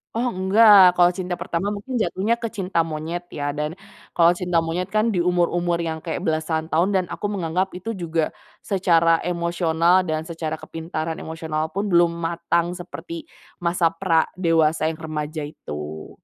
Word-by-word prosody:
Oh 235 - 0
enggak, 190 -1 +6
kalau 175 0 +5
cinta 180 -1 -4
pertama 180 +4 -2
mungkin 210 +5 -6
jatuhnya 190 +6 0
ke 230 - -2
cinta 190 -5 -1
monyet 165 +2 -5
ya 145 -1 -3
dan 150 +4 -3 0.4
kalau 170 +1 +6
cinta 175 -1 -1
monyet 165 +3 -1
kan 215 +2 +1
di 175 - +1
umur-umur 175 -1 +1
yang 160 -2 -3
kayak 175 +2 -4
belasan 160 0 -1
tahun 170 +4 +1
dan 185 - 0
aku 205 - -3
menganggap 185 -1 -2
itu 225 +5 -4
juga 165 -4 -2 0.3
secara 170 -4 +3
emosional 170 0 +2
dan 155 -3 -3
secara 160 -2 -4
kepintaran 160 0 -5
emosional 160 -1 -3
pun 200 +2 -2
belum 175 -3 +4 0.2
matang 170 +1 0
seperti 170 -2 -8 0.3
masa 170 -1 +1
pra 165 -2 +2
dewasa 165 -3 +2
yang 160 - -5
remaja 155 -1 -4
itu. 75 - -8
170 Hz, 160 wpm, -23 LUFS, 160-185 Hz, 0.4 s, enggak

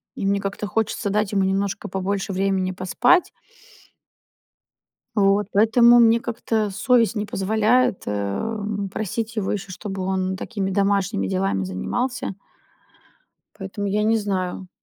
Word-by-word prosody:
и - - -4
мне 200 0 +2
как-то 200 +1 -4
хочется 220 +2 -1
дать 210 0 0
ему 195 -1 +2
немножко 200 +2 -1
побольше 195 +2 -2
времени 190 -1 0
поспать. 240 - +2 1.9
Вот, 200 0 +3
поэтому 235 +3 +6
мне 230 0 +5
как-то 225 -2 -2
совесть 235 +2 +2
не 210 -2 -2
позволяет, 220 +3 +1
эм, 200 - -3
просить 220 +2 -3
его 205 -3 -1
еще, 200 -2 -4
чтобы 190 +1 -5
он 190 0 -1
такими, 195 -1 -3
домашними 200 +1 +1
делами 190 - 0
занимался. 95 - -3 1.2
Поэтому, 200 +1 -5
я 205 +2 0
не 220 +1 +3
знаю. 190 -3 -3
200 Hz, 125 wpm, -22 LUFS, 190-220 Hz, 1.9 s, поэтому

